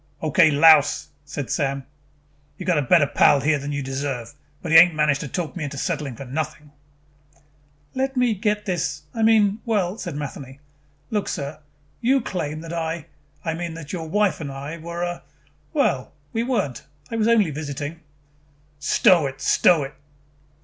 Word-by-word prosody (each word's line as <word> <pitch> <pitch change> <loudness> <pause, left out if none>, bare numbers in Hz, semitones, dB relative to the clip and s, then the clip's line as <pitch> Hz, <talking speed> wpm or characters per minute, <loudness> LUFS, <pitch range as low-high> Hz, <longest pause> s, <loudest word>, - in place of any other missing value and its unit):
"Okay, 160 +1 +5
louse," 150 0 +5 0.2
said 140 -2 -5
Sam. 140 -3 -1 0.7
"You 185 - -7
got 170 -4 +2
a - - +2
better 145 +3 +4
pal 140 - +4
here 150 +1 +1
than 140 +1 -5
you 145 -1 -2
deserve, 135 -2 -4 0.3
but 165 - -5
he 160 - +8
ain't 175 -1 +6
managed 150 -2 +2
to - - -5
talk 160 +4 -4
me 175 - -4
into 140 -1 -5
settling 150 -5 -2
for 135 - -8
nothing." 150 +2 -5 1.2
"Let 265 0 -2
me 250 -2 +3
get 210 +1 -1
this 170 -5 -2
I 225 - -3
mean 220 -2 +4
well," 205 -3 -1
said - - -5
Matheny. 140 -2 -7 0.5
"Look, 210 -2 -1
sir, 140 +1 -4 0.4
you 265 +3 +3
claim 160 - -4
that 165 0 -7
I, 165 -1 -3 0.4
I 165 - 0
mean 170 0 -5
that 165 -1 -8
your 165 -3 -4
wife 205 -1 +1
and 140 -3 -5
I 140 +5 -7
were, 170 +2 -5
uh, 175 0 -4 0.5
well, 130 -2 0 0.2
we 225 - 0
weren't. 230 - -1 0.3
I - - -2
was 220 -1 +1
only 215 -8 +4
visiting 145 +1 -5 0.5
" 145 0 -36 0.2
"Stow 170 -6 +5
it, 135 0 -8
stow 165 -5 +4
it." 135 +1 -7
155 Hz, 175 wpm, -23 LUFS, 145-180 Hz, 1.2 s, he